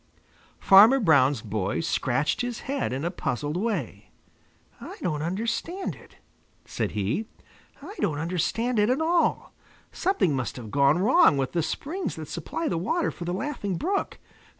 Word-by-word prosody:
Farmer 215 +8 +7
Brown's 145 - +3
boy 105 - -2
scratched 140 -3 0
his 245 -1 -4
head 275 - -2
in 135 +5 -3
a 170 - -1
puzzled 145 -3 -3
way. 180 - -3 0.7
"I - - -9
don't 155 -5 -1
understand 230 - -3
it," - - -17 0.5
said - - -3
he. 105 - -2 0.6
"I 370 +7 -8
don't 155 -7 0
understand 185 +9 -1
it 210 +2 +3
at 255 +3 +1
all. 335 +2 +1 0.4
Something 355 - +1
must 130 -2 -3
have 115 -5 -8
gone 140 +2 +4
wrong 245 - +5
with 135 -1 -1
the 170 - 0
springs 325 - -4
that - - -7
supply 330 - -4
the 165 - -1
water 330 - 0
for 175 - -8
the 175 - -2
Laughing 205 - -3
Brook. 390 - -2
180 Hz, 155 wpm, -26 LUFS, -, 0.7 s, Farmer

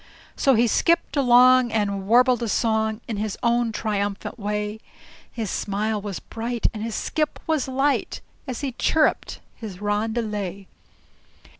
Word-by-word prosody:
So 270 -2 +3
he 235 +2 +4
skipped 335 +9 +2
along 255 -2 +5
and 200 -3 -1
warbled 245 +2 +4
a 235 - -1
song 220 +1 0
In 220 - -3
his 210 -1 -3
own 235 0 +2
triumphulant 205 0 -3
way. 210 +1 -3 0.5
His 220 -5 -4
smile 210 +1 -2
was 200 -2 -5
bright 230 +1 -5
and 215 - -6
his 225 0 -3
skip 305 -1 -2
was 315 -5 0
light 270 +2 0 0.3
As 255 -1 -4
he 275 -2 -2
chirruped 305 +5 +1
his 205 -6 -8
roundelay. 205 -2 -2
225 Hz, 140 wpm, -23 LUFS, 210-245 Hz, 0.5 s, along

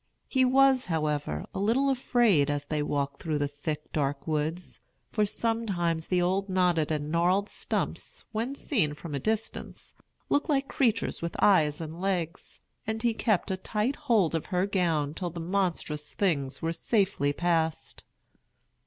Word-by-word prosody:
He 260 -1 +2
was, 265 0 +4
however, 150 - -1
a - - -3
little 245 +7 +2
afraid 235 - +3
as 145 0 -1
they 150 0 -1
walked 140 -1 -2
through 155 -2 -1
the 145 0 0
thick, 145 +1 -5
dark 140 -2 -1
woods; 160 +3 -2 0.3
for 210 -2 +2
sometimes 195 -8 -1
the 180 - +2
old 190 +3 +1
knotted 180 -4 +2
and 150 -1 -2
gnarled 180 +5 +2
stumps, - - -4
when 230 +5 -2
seen 200 - 0
from 155 0 -8
a 140 - -1
distance, 220 +8 -4 0.3
looked 290 +3 +1
like 275 -2 +2
creatures 230 -5 0
with 170 0 -4
eyes 155 -7 +4
and 165 +1 -6
legs; 180 -4 -2 0.3
and 220 +1 -2
he 235 -1 +3
kept 215 -3 0
a 190 - -1
tight 215 +7 -1
hold 225 - +2
of 165 - -2
her 180 0 +1
gown 165 -7 0
till 175 +1 -3
the 170 +1 -7
monstrous 170 -4 -2
things 145 -8 0
were 165 0 0
safely 190 - +1
passed. 165 0 -1
175 Hz, 160 wpm, -28 LUFS, 150-215 Hz, 0.3 s, was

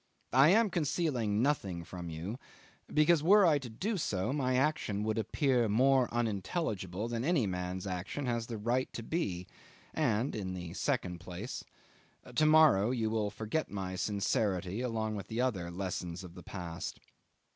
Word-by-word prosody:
I 135 +4 +7
am 215 +2 +4
concealing 135 - 0
nothing 100 - 0
from 90 0 -7
you, 85 +10 -5 0.5
because 155 +1 +4
were 200 +5 +6
I 155 -4 +4
to 130 -3 -7
do 195 - -2
so 105 - -1
my 130 -3 +1
action 125 -7 +1
would 110 +1 0
appear 120 +1 +1
more 130 +3 +4
unintelligible 105 - -2
than 120 0 -2
any 150 -5 +2
man's 90 0 -3
action 95 +9 -3
has 115 -2 -1
the 115 - -4
right 120 +5 0
to 115 - -5
be, 100 - -2 0.5
and 125 -4 +1
in 95 -3 -3
the 90 -2 -6
second 95 -8 -1
place 90 +7 -6 0.7
to 155 - +3
morrow 155 -10 +6
you 115 -4 0
will 110 -2 0
forget 110 +9 -2
my 95 -2 -4
sincerity 100 0 0
along 110 -3 -2
with 100 -1 -6
the 110 +3 -4
other 105 -10 0
lessons 90 -1 -4
of 90 -2 -10
the 90 - -10
past. 85 -3 -6
110 Hz, 160 wpm, -32 LUFS, 95-135 Hz, 0.7 s, I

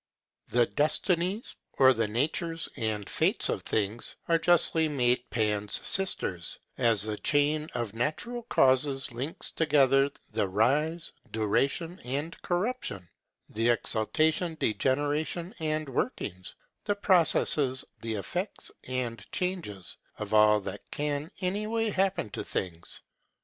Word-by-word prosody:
The 120 0 +3
Destinies, 175 - +1 0.2
or 130 -1 +6
the 115 -2 0
natures 160 - -1
and 110 -3 -2
fates - - +1
of - - -1
things, 110 +2 -1
are 165 -1 +3
justly 165 -2 +5
made 125 -3 +1
Pan's 105 -3 0
sisters, 95 - +1 0.2
as 115 -5 +3
the 105 -1 -2
chain 150 +1 +1
of 120 -4 -3
natural 155 - -2
causes 135 - +2
links 130 +7 -4
together 140 -3 +4 0.2
the 110 -2 0
rise, 150 - +1 0.2
duration, 140 - 0
and 145 +6 -3
corruption; 175 - -2 0.4
the 115 +2 0
exaltation, 155 - +1
degeneration, 145 - 0
and 155 -1 -1
workings; 105 - -3 0.3
the 205 - 0
processes, 155 -8 +3 0.2
the 115 -1 -3
effects, 175 - -3
and 125 -2 -4
changes, 170 - -3 0.2
of 105 0 -5
all 105 0 +6
that - - -6
can 150 +1 -2
any 200 +3 -1
way 225 -1 0
happen 190 - 0
to - - -4
things. 85 -3 -5
140 Hz, 120 wpm, -29 LUFS, 110-165 Hz, 0.4 s, or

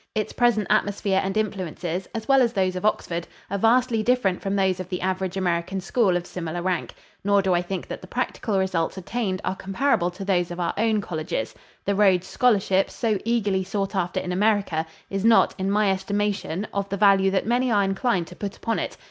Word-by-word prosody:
Its 215 -2 -2
present 235 -4 +2
atmosphere 205 -2 +1
and 195 +2 -2
influences, 185 -4 -3
as 220 -1 -4
well 270 -1 +5
as 235 -2 +2
those 185 -3 +1
of 185 - -4
Oxford, 175 -5 -1 0.2
are 200 - 0
vastly 230 +1 +3
different 215 -5 +1
from 195 0 -1
those 190 -2 +1
of 185 -1 -6
the 180 - -3
average 190 0 -2
American 180 +1 -1
school 190 -1 +2
of 175 - -5
similar 175 -1 -5
rank; 180 -1 -2 0.3
nor 200 0 +4
do 190 -1 +2
I 175 - +2
think 180 +1 -5
that - - -6
the - - -11
practical 210 -4 -2
results 190 -2 0
attained 190 0 -2
are - - -1
comparable 195 -1 0
to 185 +2 -8
those 180 -2 +1
of 175 0 -6
our 175 - 0
own 220 -1 +1
colleges. 155 - -3 0.3
The 200 - +1
Rhodes 190 -3 +3
scholarship, 195 -4 +2
so 220 -4 -1
eagerly 205 -5 +1
sought 195 +1 -3
after 180 -2 0
in 180 - -4
America, 195 -5 +1 0.2
is 195 0 -2
not, 225 0 +5
in 190 +1 0
my 205 0 +3
estimation, 200 -1 -1
of 200 0 -2
the 200 - -2
value 195 -1 +5
that 190 0 0
many 245 +3 +1
are 205 -3 +3
inclined 195 -1 0
to 180 - -12
put 200 +1 -5
upon 230 -1 -1
it. - - -4
195 Hz, 205 wpm, -24 LUFS, 185-215 Hz, 0.3 s, well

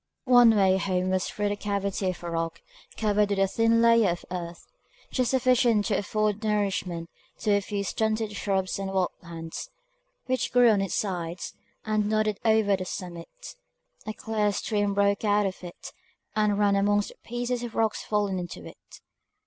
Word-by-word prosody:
One 245 -3 +7
way 190 -2 +4
home 185 0 0
was 185 -1 +1
through 205 -1 -1
the 205 - -1
cavity 200 -2 -2
of 180 - -6
a 170 - -4
rock 165 0 -3 0.3
covered 210 -1 +2
with 200 - 0
a 195 - +4
thin 230 +3 +2
layer 230 -3 +5
of 175 0 -3
earth, 170 -2 -6 0.5
just 255 -3 +1
sufficient 250 -4 +3
to 205 -4 +1
afford 215 +1 -1
nourishment 195 -5 -1 0.3
to 215 - +1
a 200 0 +3
few 200 0 -3
stunted 220 +1 -1
shrubs 190 -1 -1
and 195 -1 -3
wild 190 -2 +1
plants, 165 -1 -7 0.6
which 255 0 -1
grew 245 -2 +6
on 205 -2 +2
its 195 - -2
sides, 175 -3 -3 0.3
and 215 -1 0
nodded 215 -1 +1
over 220 -3 +3
the 185 - -4
summit. 180 - -8 0.5
A 215 - -3
clear 215 -2 -1
stream 205 -1 -1
broke 200 +1 +2
out 205 -1 +3
of 190 -1 -4
it, 175 -1 -9 0.4
and 210 -1 +2
ran 205 -1 +3
amongst 205 +1 +2
the - - -14
pieces 240 +1 -3
of 240 -2 -6
rocks 220 -1 +1
fallen 205 -3 -1
into 175 - -7
it. - - -14
205 Hz, 175 wpm, -27 LUFS, 190-220 Hz, 0.6 s, One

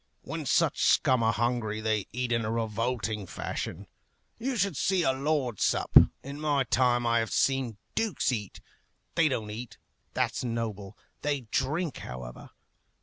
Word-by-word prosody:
When - - -5
such - - +2
scum 130 -2 +4
are 115 0 +3
hungry, 120 -2 0
they 110 -2 0
eat 125 0 -2
in 115 -1 +2
a 110 - -2
revolting 110 -2 -2
fashion. - - -5 0.5
You 255 +2 -1
should 200 -4 +1
see 185 +6 +2
a 135 - +3
lord 135 -5 -1
sup. - - 0 0.3
In 140 +2 -7
my 145 -3 +2
time 120 -1 +2
I 115 0 +3
have 115 -1 -2
seen 135 -5 +1 0.2
dukes 215 -12 0
eat. 105 -5 -4 0.5
They 165 -2 +4
don't 110 -5 -2
eat; 115 +2 -7 0.4
that's - - 0
noble. 110 -4 -4 0.2
They 145 -2 0
drink, 140 +6 -1
however. 60 -1 -8
120 Hz, 150 wpm, -29 LUFS, 110-140 Hz, 0.5 s, scum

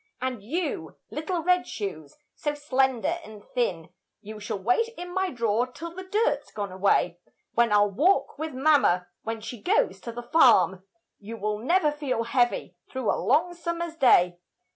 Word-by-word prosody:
And 255 -4 -3
you, 320 - -3
little 330 +2 -3
red 360 +1 +2
shoes, 175 -9 -6 0.2
so 295 -1 -3
slender 270 +2 0
and 215 -5 -12
thin, 170 -10 -1 0.3
You 215 +1 -9
shall 210 0 -4
wait 245 - +1
in 355 0 -7
my 380 0 0
draw'r 235 -1 0
till 335 0 -7
the 375 - -7
dirt's 420 +5 0
gone 205 -2 -4
away; 185 -2 +1 0.3
When 235 -1 +3
I'll 205 0 +4
walk 310 - +2
with 315 0 -3
mamma 265 - +3 0.2
when 225 0 -4
she 225 0 -7
goes 190 -2 +1
to 235 - -6
the 240 +1 -7
farm, 190 - +4 0.4
You 225 +3 -8
will 210 0 -2
never 305 - +2
feel 285 -6 -2
heavy 240 -6 0
through 260 -4 -1
a - - -2
long 350 +3 +2
summer's 340 -1 -4
day. 180 - +4
245 Hz, 165 wpm, -26 LUFS, 205-320 Hz, 0.4 s, I'll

